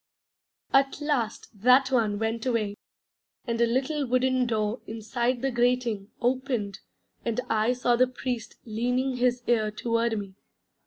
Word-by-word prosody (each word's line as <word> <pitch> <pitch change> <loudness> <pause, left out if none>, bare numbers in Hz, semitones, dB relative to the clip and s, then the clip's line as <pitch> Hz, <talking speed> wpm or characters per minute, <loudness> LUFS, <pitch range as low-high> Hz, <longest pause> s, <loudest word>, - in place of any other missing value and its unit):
At 270 0 +3
last 280 -7 -1
that 255 +3 +5
one 220 -5 +2
went 225 +3 -2
away, 215 -4 0 0.7
and 235 -2 -1
a 235 - +5
little 270 +5 0
wooden 255 0 +2
door 215 0 -1
inside 235 +3 -2
the 270 - +1
grating 240 -4 +1
opened 245 -5 -1 0.4
and 235 0 -1
I 225 +2 +2
saw 245 -1 +2
the 255 +2 +4
Priest 250 -2 -4
leaning 250 +4 -1
his 245 0 +1
ear 220 -3 +2
toward 230 +1 0
me. 200 -2 -6
240 Hz, 140 wpm, -27 LUFS, 225-255 Hz, 0.7 s, that